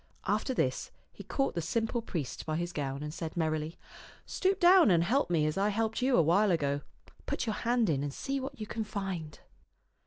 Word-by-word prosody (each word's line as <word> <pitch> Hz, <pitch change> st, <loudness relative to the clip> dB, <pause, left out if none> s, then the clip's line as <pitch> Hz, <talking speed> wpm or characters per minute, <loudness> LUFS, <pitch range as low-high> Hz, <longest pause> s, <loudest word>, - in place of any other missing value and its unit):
After 215 Hz, +7 st, 0 dB
this 130 Hz, -, 0 dB, 0.2 s
he -, -, -10 dB
caught 275 Hz, -, -1 dB
the 170 Hz, -, -2 dB
simple 225 Hz, +7 st, -1 dB
priest 165 Hz, -, -4 dB
by 155 Hz, -, -2 dB
his 175 Hz, +1 st, -3 dB
gown 140 Hz, -1 st, -3 dB
and 150 Hz, 0 st, -5 dB
said 165 Hz, 0 st, -5 dB
merrily, 155 Hz, 0 st, -1 dB, 0.3 s
" -, -, -20 dB
Stoop 385 Hz, +1 st, 0 dB
down 355 Hz, -, +7 dB
and 170 Hz, -3 st, +4 dB
help 255 Hz, +8 st, +1 dB
me 160 Hz, -3 st, +2 dB
as 155 Hz, +4 st, -1 dB
I 200 Hz, +1 st, +2 dB
helped 220 Hz, +2 st, -1 dB
you 255 Hz, 0 st, +3 dB
a 170 Hz, -, +6 dB
while 195 Hz, +7 st, +4 dB
ago. 145 Hz, -5 st, +1 dB, 0.5 s
Put -, -, -1 dB
your 220 Hz, -, -1 dB
hand 235 Hz, 0 st, +1 dB
in 145 Hz, -5 st, +1 dB
and 145 Hz, 0 st, -2 dB
see 275 Hz, -, -3 dB
what 270 Hz, 0 st, -6 dB
you 215 Hz, -, -4 dB
can 220 Hz, +1 st, -3 dB
find." 190 Hz, -7 st, -5 dB
185 Hz, 215 wpm, -31 LUFS, 155-230 Hz, 0.5 s, down